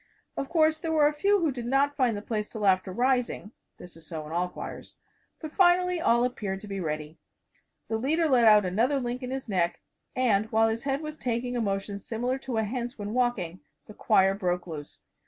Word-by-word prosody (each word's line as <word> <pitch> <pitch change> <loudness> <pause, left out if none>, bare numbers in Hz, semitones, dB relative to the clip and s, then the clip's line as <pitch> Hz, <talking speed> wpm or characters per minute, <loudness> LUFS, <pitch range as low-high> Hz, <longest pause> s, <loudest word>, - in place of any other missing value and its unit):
Of 275 - -4
course, 315 -2 +3
there 325 0 -3
were 310 -2 +4
a 295 - +3
few 400 +6 +2
who 320 -3 +2
did 240 -2 -6
not 275 +3 +2
find 250 -6 +1
the 205 - -7
place 210 -2 -3
till 215 -3 -4
after 185 -1 +2
rising 245 -1 0 0.3
this 180 - -12
is 165 -1 -13
so 160 -3 -6
in 150 - -9
all 175 +2 0
choirs - - -8 0.4
but 310 - -7
finally 360 -1 +3
all 235 -5 +3
appeared 210 -6 -2
to 210 - -10
be 195 -1 -4
ready. 155 -2 -4 0.7
The 220 - -1
leader 315 +7 +1
let 250 -5 +4
out 210 -2 +7
another 235 +10 +1
link 245 0 -3
in 250 - -5
his 265 0 -4
neck, 175 -4 0 0.4
and 220 -4 +1
while 225 0 +4
his 230 +3 -3
head 275 +1 -1
was 305 0 -6
taking 245 -1 -2
a 240 - 0
motion 200 -1 -2
similar 245 +5 -2
to 255 -3 -4
a 220 - +2
hen's 240 +3 -4
when 205 0 -5
walking, 230 -9 -1 0.3
the 210 - -12
choir 195 -3 +3
broke 180 -2 -2
loose. 155 -4 -8
235 Hz, 215 wpm, -27 LUFS, 195-270 Hz, 0.7 s, out